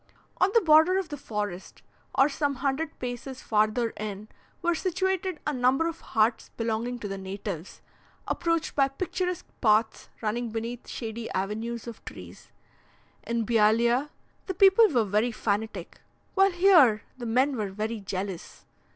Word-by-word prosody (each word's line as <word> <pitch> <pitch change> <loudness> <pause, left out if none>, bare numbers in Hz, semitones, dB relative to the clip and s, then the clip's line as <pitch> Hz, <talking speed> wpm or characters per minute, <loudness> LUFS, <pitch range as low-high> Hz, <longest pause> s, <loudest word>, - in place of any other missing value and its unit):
On 375 - +4
the 460 - +7
border 320 +2 +5
of 380 -4 -2
the 295 - -4
forest, 210 -8 -5 0.3
or 270 - +5
some 285 -1 -1
hundred 280 +4 -2
paces 250 +1 -6
farther 215 +2 +1
in, 210 0 -6 0.3
were 345 0 +3
situated 370 0 -1
a 300 - 0
number 255 +4 +2
of 335 -1 -5
huts 225 +1 +1
belonging 230 +2 -2
to 220 - -6
the 195 -1 -5
natives, 190 -2 -6 0.5
approached 335 -2 -1
by 275 -2 +4
picturesque 360 +5 -3 0.2
paths 220 -1 +2
running 235 +2 -2
beneath 230 +2 -5
shady 225 -1 -5
avenues 220 +4 -3
of 235 -2 -9
trees. - - -11 0.8
In 235 -1 0
Bealeah, 235 +5 +3 0.4
the 375 - -3
people 390 +4 +7
were 240 -8 +2
very 210 +4 +1
fanatic, 210 -4 -3 0.3
while 390 0 +5
here 345 - +5 0.2
the 240 - -4
men 260 +5 +2
were 210 -4 -2
very 215 +3 -3
jealous. 190 -2 -6
235 Hz, 145 wpm, -27 LUFS, 215-305 Hz, 0.8 s, the